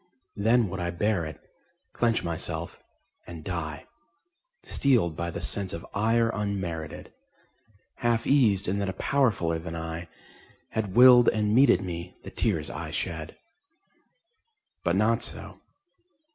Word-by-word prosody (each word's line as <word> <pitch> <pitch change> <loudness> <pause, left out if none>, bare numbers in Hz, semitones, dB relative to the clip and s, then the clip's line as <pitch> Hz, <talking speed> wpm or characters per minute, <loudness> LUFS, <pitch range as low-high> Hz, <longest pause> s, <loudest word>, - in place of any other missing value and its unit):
Then 115 +2 +3
would 95 +1 -5
I 85 0 -1
bear 90 0 0
it, 80 -1 -8 0.5
clench 115 -4 +1
myself, 85 -2 -4 0.5
and 85 -3 -9
die, 80 -4 -4 0.8
Steeled 115 - +2
by 85 +1 -3
the 85 - -5
sense 100 -2 -3
of 85 - -6
ire 115 +2 +2
unmerited; 90 -6 -4 0.8
Half 120 -1 +1
eased 110 -9 +3
in 100 +3 0
that 100 -1 -1
a - - -3
Powerfuller 100 -9 +1
than 85 -1 -6
I 80 +1 -5 0.6
Had 105 -3 -3
willed 125 -1 +8
and 105 -1 0
meted 130 -4 +5
me 90 0 -6
the - - -9
tears - - -1
I - - -6
shed. 80 -2 -4 1.5
But - - +1
not - - +2
so. - - -8
95 Hz, 130 wpm, -27 LUFS, 85-115 Hz, 1.5 s, willed